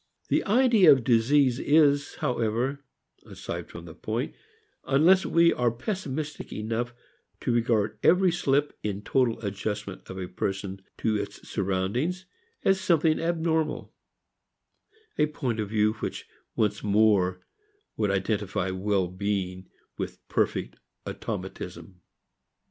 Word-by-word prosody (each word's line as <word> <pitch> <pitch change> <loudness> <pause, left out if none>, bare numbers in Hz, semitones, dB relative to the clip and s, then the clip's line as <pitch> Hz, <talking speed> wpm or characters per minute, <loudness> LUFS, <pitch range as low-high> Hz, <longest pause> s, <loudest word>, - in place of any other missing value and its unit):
The - - +2
idea 220 - +6
of 135 -4 +4
disease 125 +2 +3
is, 145 -1 +3
however, 125 +4 -1 0.4
aside - - -7
from 85 - -9
the 80 - -10
point, 110 - -3 0.5
unless 170 +8 +4
we 170 0 +4
are 125 -1 +2
pessimistic 150 - -4
enough 115 +3 -2 0.5
to 125 - 0
regard 115 -3 +1
every 180 0 +5
slip 145 -3 +1
in 105 -1 -3
total 125 -2 +1
adjustment 105 -1 -4
of 95 - -7
a 95 -1 -4
person 95 +1 -4 0.2
to 110 -1 0
its - - -6
surroundings 100 - -1 0.4
as 195 0 +3
something 165 -4 +3
abnormal 160 -2 -1 1.3
a 150 - +4
point 125 -6 -3
of 105 -2 -2
view 110 0 +2
which - - -4 0.3
once 105 -1 0
more 100 -3 +3 0.5
would 105 -2 0
identify 100 -1 -1
well 95 0 0
being 95 0 -3 0.3
with - - -4
perfect - - -1 0.3
automatism. 90 -2 -6
115 Hz, 120 wpm, -27 LUFS, 100-150 Hz, 1.3 s, idea